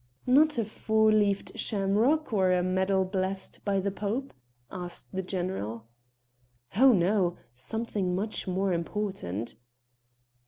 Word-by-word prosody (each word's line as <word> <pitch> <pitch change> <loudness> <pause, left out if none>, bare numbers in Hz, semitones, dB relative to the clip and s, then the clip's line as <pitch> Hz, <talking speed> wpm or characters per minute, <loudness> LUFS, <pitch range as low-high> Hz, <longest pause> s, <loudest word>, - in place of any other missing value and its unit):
"Not 295 +3 +5
a 230 - +1
four 220 0 +2
leaved 205 -2 +2
shamrock 225 +8 +1
or 190 -3 +3
a 180 -1 +2
medal 190 +1 +1
blessed 190 0 -3
by 200 -1 +1
the 200 +1 -1
pope?" 215 +7 -3 0.4
asked 180 -2 -6
the 190 - -1
general. 175 - -4 0.9
"Oh, 260 +5 +7
no! 185 -2 +2 0.2
something 195 - -2
much 210 +2 -2
more 190 +1 0
important." 170 - -3
195 Hz, 120 wpm, -28 LUFS, 185-215 Hz, 0.9 s, Oh